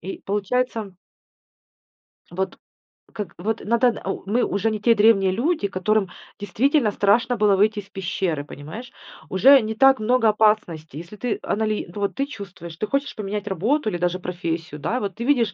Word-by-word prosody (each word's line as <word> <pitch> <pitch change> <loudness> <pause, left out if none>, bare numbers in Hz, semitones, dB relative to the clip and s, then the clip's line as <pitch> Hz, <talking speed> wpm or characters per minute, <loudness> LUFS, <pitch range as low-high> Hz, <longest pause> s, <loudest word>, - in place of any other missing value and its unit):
И 190 +3 -6
получается 210 0 -2 1.4
вот 190 +2 -3 0.6
как 205 -5 -6
вот 220 +5 -2
надо, 235 +1 +2
о 195 - -4
мы 225 +5 +1
уже 200 +3 0
не 215 - -3
те 235 +2 +5
древние 205 -3 +4
люди, 240 - 0
которым 195 +1 0 0.3
действительно 230 - +1
страшно 225 +5 +2
было 210 -1 +4
выйти 210 +2 +2
из 200 -1 -11
пещеры, 185 -6 -2
понимаешь. 160 - -9 0.4
Уже 265 +9 +6
не 220 0 -4
так 270 +3 +5
много 230 +2 +2
опасностей. 210 -9 +1
Если 170 +5 -10
ты 230 +2 -3
анали 215 0 -1
ну 205 - -6
вот 200 - -1
ты 275 - 0
чувствуешь, 195 - -9
ты 215 - -2
хочешь 275 +3 -2
поменять 205 0 -4
работу 215 - 0
или 175 - -3
даже 180 +1 -1
профессию, 170 -3 -4
да, 225 - -1
вот 200 -5 -4
ты 235 - -5
видишь, 240 -5 +2
210 Hz, 170 wpm, -23 LUFS, 190-230 Hz, 1.4 s, Уже